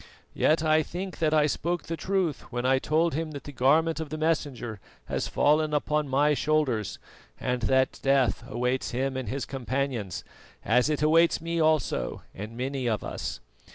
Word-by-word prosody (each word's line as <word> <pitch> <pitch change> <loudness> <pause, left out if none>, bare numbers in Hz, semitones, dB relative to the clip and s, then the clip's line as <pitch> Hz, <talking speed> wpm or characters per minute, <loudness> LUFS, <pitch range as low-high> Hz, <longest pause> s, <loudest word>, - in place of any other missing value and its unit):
Yet 155 +1 +2
I 155 0 +4
think 180 +5 -6
that 155 -2 +2
I 155 -1 +4
spoke 170 +3 -1
truth 170 -1 -2
when 120 0 -2
I 130 0 +4
told 160 +4 +1
him 155 +1 -3
that 140 - -7
the 145 - -8
garment 155 +6 +3
of 160 -2 -4
the 155 - -4
Messenger 145 -9 -1 0.3
has - - -2
fallen 150 +1 +2
upon 150 0 0
my 145 +3 +3
shoulders, 145 -8 0 0.4
and 125 -1 -1
that 130 0 +2
death 135 -3 +2
awaits 125 +3 -1
him 130 +2 -1
and 130 -2 -3
his 135 +1 -3
companions, 130 -6 -3 0.4
as 125 +6 +3
it 150 -1 0
awaits 165 +2 +4
me 170 +1 -2
also 155 - +1
and 110 +4 -8
many 130 0 -2
of 110 -4 0
us. - - -5
145 Hz, 170 wpm, -27 LUFS, 130-155 Hz, 0.4 s, I